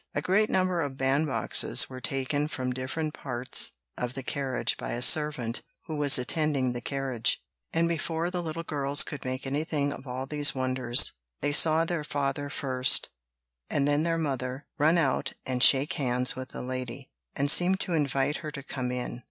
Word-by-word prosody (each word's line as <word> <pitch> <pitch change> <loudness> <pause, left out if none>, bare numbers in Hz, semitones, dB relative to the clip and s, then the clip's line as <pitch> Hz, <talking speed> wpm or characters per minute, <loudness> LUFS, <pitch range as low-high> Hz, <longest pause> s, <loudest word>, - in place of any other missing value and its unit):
A - - -1
great 210 +4 +1
number 185 -2 0
of 140 -3 -5
bandboxes 135 -2 +2
were 130 -1 -10
taken 145 +1 -2
from 130 -4 -4
different 150 +5 -5
parts 125 -2 0 0.3
of 125 0 -5
the 135 - -6
carriage 135 -1 -3
by - - -6
a 120 - -4
servant 130 -6 +3 0.2
who 160 - -6
was 145 -2 +6
attending 135 -1 -1
the 120 - -6
carriage; 130 -3 0 0.3
and 165 +1 0
before 170 +1 -3
the 180 -1 -3
little 165 0 -6
girls 145 -2 +2
could 150 - -8
make 130 +1 -5
anything 145 +1 -2
of 135 - -11
all 130 +1 -5
these 145 +1 +3
wonders, 130 -2 +4 0.3
they 145 - -1
saw 160 +2 +5
their 165 -2 -3
father 145 0 -3
first, 130 -2 +2 0.6
and 140 -1 0
then 145 +1 +1
their 165 +1 -1
mother, 135 -3 -4
run 160 +4 +3
out 140 -6 -1
and 125 -1 -3
shake 135 +3 +6
hands 125 -2 0
with 130 0 -7
the - - -6
lady, 130 +1 -7 0.2
and 140 +1 +4
seem 180 +3 +7
to 185 -2 -3
invite 145 -2 -1
her 155 - -7
to 140 -2 -9
come 130 -3 -5
in. 125 -1 -5
140 Hz, 180 wpm, -26 LUFS, 130-155 Hz, 0.6 s, seem